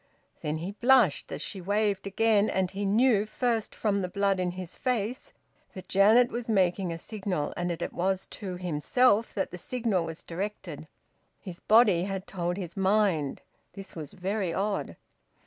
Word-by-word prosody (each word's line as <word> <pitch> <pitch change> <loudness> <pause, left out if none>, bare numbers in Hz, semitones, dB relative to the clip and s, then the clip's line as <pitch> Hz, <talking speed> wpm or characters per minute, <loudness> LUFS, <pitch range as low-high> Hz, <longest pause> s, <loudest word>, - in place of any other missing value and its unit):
Then 150 +1 -2
he 175 +5 -5
blushed 240 - +3
as - - -4
she 195 - -5
waved 200 +1 0
again, 215 +1 +2
and 190 -1 0
he 200 +1 -3
knew 215 0 +3
first 230 0 -1
from 200 -2 0
the 180 - -2
blood 195 0 +1
in 180 -1 0
his 185 -1 -7
face 245 -1 -2 0.4
that 185 - -9
Janet 220 +5 +5
was 235 0 -5
making 185 -3 +1
a 165 - -4
signal, 190 -4 -3
and 175 0 -2
that 170 - -3
it - - -5
was 190 +2 -1 0.2
to 190 -3 -4
himself 200 +7 +2
that 195 - -2
the 180 - -7
signal 225 -6 -1
was 165 0 -7
directed: 200 +5 -6 0.5
his 180 -4 -9
body 210 -6 +4
had 195 -1 -4
told 175 -1 -3
his 180 -2 -6
mind; 190 -7 +1 0.3
this 195 -1 -10
was 155 -4 -7
very 190 0 -2
odd. 200 +3 -2
195 Hz, 170 wpm, -28 LUFS, 180-215 Hz, 0.5 s, Janet